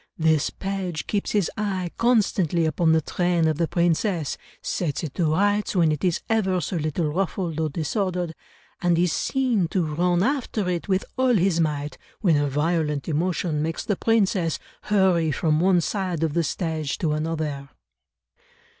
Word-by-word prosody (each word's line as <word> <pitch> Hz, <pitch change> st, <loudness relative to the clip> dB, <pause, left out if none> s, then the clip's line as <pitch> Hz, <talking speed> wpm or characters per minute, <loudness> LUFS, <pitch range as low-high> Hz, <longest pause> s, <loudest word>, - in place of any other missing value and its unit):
This 160 Hz, -2 st, +2 dB
page 190 Hz, -4 st, -4 dB
keeps 205 Hz, -2 st, -1 dB
his 205 Hz, -6 st, +1 dB
eye 190 Hz, -5 st, -2 dB
constantly 195 Hz, -8 st, +2 dB
upon 160 Hz, +1 st, +2 dB
the 160 Hz, 0 st, +4 dB
train 175 Hz, -1 st, +1 dB
of 155 Hz, 0 st, 0 dB
the 165 Hz, -, +2 dB
princess, 170 Hz, -1 st, 0 dB, 0.2 s
sets 160 Hz, -5 st, -2 dB
it 150 Hz, -5 st, -4 dB
to 160 Hz, -4 st, +1 dB
rights 205 Hz, +2 st, +1 dB
when 165 Hz, -4 st, +4 dB
it 150 Hz, -, -3 dB
is 180 Hz, -3 st, +1 dB
ever 190 Hz, -5 st, +1 dB
so 175 Hz, +1 st, -3 dB
little 155 Hz, 0 st, -1 dB
ruffled 180 Hz, -3 st, -2 dB
or 160 Hz, -1 st, 0 dB
disordered, 175 Hz, +2 st, -2 dB, 0.5 s
and 175 Hz, -1 st, +2 dB
is 175 Hz, -1 st, +2 dB
seen 250 Hz, -9 st, +1 dB
to 175 Hz, 0 st, 0 dB
run 175 Hz, +3 st, +1 dB
after 245 Hz, -6 st, -1 dB
it 175 Hz, +1 st, -2 dB
with 190 Hz, -1 st, +1 dB
all 260 Hz, -2 st, +3 dB
his 185 Hz, -3 st, +2 dB
might, 150 Hz, -2 st, -1 dB, 0.2 s
when 175 Hz, -6 st, +3 dB
a 145 Hz, -1 st, +1 dB
violent 150 Hz, 0 st, 0 dB
emotion 165 Hz, -1 st, 0 dB
makes 165 Hz, +5 st, -3 dB
the 210 Hz, -3 st, 0 dB
princess 195 Hz, -7 st, +1 dB, 0.3 s
hurry 185 Hz, -6 st, +3 dB
from 155 Hz, 0 st, +1 dB
one 180 Hz, 0 st, +4 dB
side 180 Hz, -4 st, -2 dB
of 160 Hz, -2 st, 0 dB
the 170 Hz, +1 st, +1 dB
stage 160 Hz, -3 st, -2 dB
to 160 Hz, -4 st, 0 dB
another." 155 Hz, -3 st, -3 dB
170 Hz, 165 wpm, -24 LUFS, 155-190 Hz, 0.5 s, the